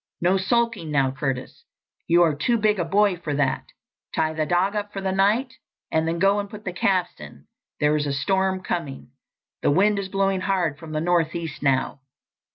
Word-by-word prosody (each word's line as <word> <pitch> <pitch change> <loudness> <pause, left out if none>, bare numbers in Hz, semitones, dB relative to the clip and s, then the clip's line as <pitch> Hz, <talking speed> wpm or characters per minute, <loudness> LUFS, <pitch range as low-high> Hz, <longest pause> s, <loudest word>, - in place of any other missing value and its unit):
No 180 +2 +2
sulking 210 -2 0
now, 135 -3 +2
Curtis. 135 -2 -4 0.4
You 175 +1 +5
are 160 -3 +3
too 155 +12 +1
big 215 -2 +2
a - - +2
boy 200 +1 +2
for 155 -4 -4
that. 140 -2 0 0.5
Tie 155 0 +1
the 155 -1 -1
dog 185 +4 +1
up 205 0 -3
for 195 - -5
the 190 -1 -1
night 210 +7 +2 0.4
and 160 0 +1
then 165 +1 -1
go 195 +3 +3
and 205 0 -4
put 210 0 -11
the 180 - -3
calves 180 0 0
in. - - -12 0.3
There 150 0 +3
is 150 -1 0
a - - -1
storm 190 +5 0
coming. 145 -8 -4 0.5
The - - +2
wind 200 +7 +3
is 195 -1 -4
blowing 195 -1 0
hard 180 -7 0
from 160 -1 -9
the 155 - -1
northeast 170 -1 -1
now." 135 -1 +1
175 Hz, 195 wpm, -24 LUFS, 155-195 Hz, 0.5 s, You